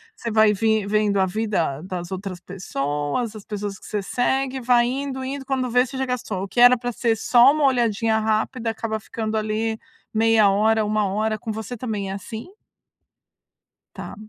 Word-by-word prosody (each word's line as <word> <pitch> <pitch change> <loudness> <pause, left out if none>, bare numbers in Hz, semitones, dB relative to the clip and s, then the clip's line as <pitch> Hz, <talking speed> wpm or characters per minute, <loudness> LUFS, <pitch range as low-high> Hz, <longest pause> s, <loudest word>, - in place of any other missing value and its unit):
Você 235 - -5
vai 215 -1 +5
vim 220 0 +1
vendo 210 -1 +2
a 190 - +4
vida 180 -8 -1
das 180 -1 -6
outras 190 -1 -5
pessoas, 170 - -3
as 210 - -9
pessoas 205 -2 -5
que - - -15
você 210 - -2
segue, 265 +3 -1
vai 240 0 +4
indo, 265 +1 -3
indo, 270 +1 -4
quando 260 -2 -1
vê, 250 +1 +4
você 265 - -7
já 265 - 0
gastou. 225 -7 -3
O - - -4
que 240 - -3
era 245 +1 +8
pra 245 +1 -3
ser 230 -1 0
só 240 +4 +6
uma 305 0 0
olhadinha 230 -3 +2
rápida, 220 +2 -1
acaba 220 -1 -3
ficando 220 +1 -4
ali 220 +1 -1 0.3
meia 220 -2 +4
hora, 215 +2 +2
1 210 -1 +1
hora. 215 +2 -1
Com 220 - -5
você 220 +3 -5
também 210 -5 -3
é - - -3
assim? 220 - -8 1.4
Tá. - - -7
220 Hz, 185 wpm, -23 LUFS, 205-245 Hz, 1.4 s, era